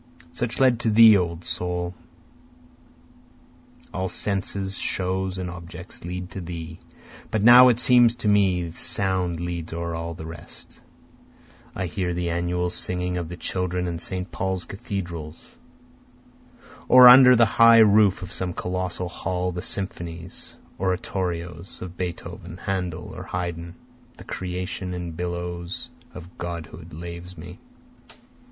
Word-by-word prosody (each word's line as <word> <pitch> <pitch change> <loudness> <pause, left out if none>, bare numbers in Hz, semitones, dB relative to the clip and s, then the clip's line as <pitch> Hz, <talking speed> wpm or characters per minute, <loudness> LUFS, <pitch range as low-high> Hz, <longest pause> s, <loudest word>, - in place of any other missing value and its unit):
(Such 120 +7 -3
led 130 -3 +4
to 120 - 0
thee 110 0 +8
O 85 -2 -2
soul, 90 +1 -2 2.0
All 95 0 -2
senses, 100 0 -3
shows 95 0 -2
and 90 -1 -4
objects, 90 +1 -10
lead 90 +1 -6
to 95 - -6
thee, 85 -1 -7 0.5
But 110 -2 -1
now 125 +2 +9
it 120 -2 +4
seems 120 -1 +5
to 120 - -3
me 95 -5 +2
sound 90 0 0
leads 85 -1 -4
o'er 85 0 -3
all 85 0 -5
the 80 - -8
rest.) 80 -1 -11 1.0
I 95 - -2
hear 90 0 -2
the 85 -1 -2
annual 90 +1 -1
singing 90 0 -2
of 85 -2 -4
the 90 - -7
children 90 0 -2
in 85 -1 -4
St. 90 +2 -4
Paul's 95 -2 -2
cathedral, 85 -7 -6 1.5
Or, 125 0 +9
under 125 0 +9
the 115 0 +6
high 115 +1 +6
roof 105 -3 +5
of 90 - -8
some 90 -1 -3
colossal 90 0 -3
hall, 90 +1 -3
the 90 0 -5
symphonies, 85 -3 -5 0.2
oratorios 90 -2 -3
of 90 -1 -8
Beethoven, 90 -1 -6
Handel, 90 -4 -4
or - - -7
Haydn, 85 -1 -5 0.4
The - - -11
Creation 90 0 -4
in 90 -1 -5
billows 85 +5 -5 0.2
of 90 0 -12
godhood 85 -1 -7
laves 85 +2 -8
me. 85 +3 -10
90 Hz, 135 wpm, -24 LUFS, 85-95 Hz, 2.0 s, now